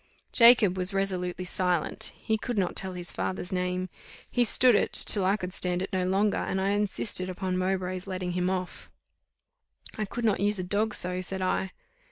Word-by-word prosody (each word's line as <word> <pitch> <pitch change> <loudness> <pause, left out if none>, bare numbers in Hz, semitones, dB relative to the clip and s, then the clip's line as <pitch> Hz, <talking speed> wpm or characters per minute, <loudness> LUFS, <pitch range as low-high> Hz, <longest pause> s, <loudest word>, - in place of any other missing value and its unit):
Jacob 230 -6 +6
was 185 +2 0
resolutely 185 -2 -2
silent; 180 -2 0
he 220 -1 -2
would 240 -3 -2
not 190 -3 0
tell 190 -1 -4
his 175 -1 -2
father's 185 0 -4
name. 180 0 -2 0.4
He 245 - +2
stood 245 +2 +4
it, 205 - +1
till 200 - +5
I 195 +3 +2
could 180 -2 -6
stand 180 0 0
it 195 - -7
no 185 -1 0
longer, 200 +2 +1
and 190 - -2
I 190 +1 0
insisted 205 -2 0
upon 185 0 -3
Mowbray's 185 0 -2
letting 185 -1 -4
him 180 +1 -1
off. 185 -1 -5 1.1
"I 215 - 0
could 235 +3 -5
not 210 -3 +2
use 205 +1 +1
a 185 - -2
dog 210 +4 -1
so," 180 0 0
said 190 +1 -3
I. 185 +1 -1
185 Hz, 190 wpm, -27 LUFS, 180-205 Hz, 1.1 s, Jacob